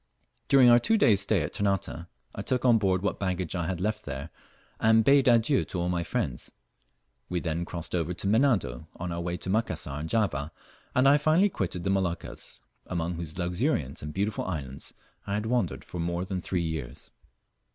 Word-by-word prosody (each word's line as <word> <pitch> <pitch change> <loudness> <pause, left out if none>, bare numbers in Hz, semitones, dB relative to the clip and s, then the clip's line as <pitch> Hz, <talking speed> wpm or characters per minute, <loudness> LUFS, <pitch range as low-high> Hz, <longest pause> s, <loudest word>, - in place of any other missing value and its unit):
During 135 -2 +6
our 120 - +7
two 225 - +2
days' 105 - +5
stay 100 -4 +2
at 75 - -5
Ternate, 95 -4 -1 0.3
I - - -5
took 130 0 -1
on 120 -3 +6
board 95 -2 +1
what 100 - -1
baggage 90 -3 -2
I 85 -2 -1
had 90 -2 -2
left 105 +3 -1
there, 70 +2 -6 0.5
and 110 0 +5
bade 140 -1 +5
adieu 120 +3 +4
to 90 - -4
all 90 +1 0
my 85 -1 0
friends. 65 -6 -3 0.8
We 90 - -1
then 85 0 -2
crossed 85 -1 -5
over 85 -1 0
to 85 - -6
Menado, 100 - +2
on 90 0 -5
our 85 0 -3
way 90 0 -2
to 95 - -5
Macassar 95 -9 -1
and 80 +2 -5
Java, 85 -9 0 0.4
and 130 +2 +5
I 145 +2 +6
finally 160 +7 +4
quitted 90 - -3
the 95 - +1
Moluccas, 95 -3 -3 0.3
among 85 -1 -2
whose 85 -2 -6
luxuriant 90 - -1
and 75 - -5
beautiful 100 +5 -2
islands 70 -7 -5 0.3
I 100 - -1
had 105 +1 -2
wandered 115 -7 -1
for 90 - -7
more 85 +2 -1
than 95 -1 -3
three 90 -1 -1
years. 80 -6 -5
90 Hz, 195 wpm, -28 LUFS, 85-110 Hz, 0.8 s, our